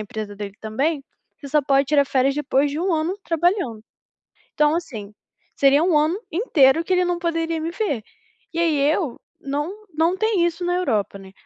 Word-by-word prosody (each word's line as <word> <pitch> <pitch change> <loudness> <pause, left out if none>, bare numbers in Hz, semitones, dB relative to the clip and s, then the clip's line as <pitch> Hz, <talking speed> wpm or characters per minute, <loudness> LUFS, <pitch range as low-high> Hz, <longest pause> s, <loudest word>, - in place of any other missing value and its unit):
empresa 215 -1 -6
dele 200 -1 -6
também, 275 +8 -1 0.4
você 285 -3 -9
só 300 +1 +3
pode 275 +1 +3
tirar 285 -2 +3
férias 270 +1 +2
depois 285 -1 +1
de 300 +3 -3
1 375 - 0
ano 320 +4 -1
trabalhando. 330 - 0 0.7
Então 300 +1 +3
assim, 220 -12 -5 0.4
seria 280 +3 +4
1 345 -4 +3
ano 320 +7 +1
inteiro 325 - +3
que 370 - -1
ele 365 - +3
não 350 -1 0
poderia 330 -1 -1
me 330 +1 -3
ver. 320 - -2 0.5
E 335 - -2
aí 320 -4 +2
eu 310 -8 -2 0.2
não 300 +10 -4
não 325 +4 +2
tem 430 -5 +2
isso 345 +1 -2
na 355 0 +1
Europa, 220 - -1
né. 190 0 -13
305 Hz, 185 wpm, -22 LUFS, 270-345 Hz, 0.7 s, seria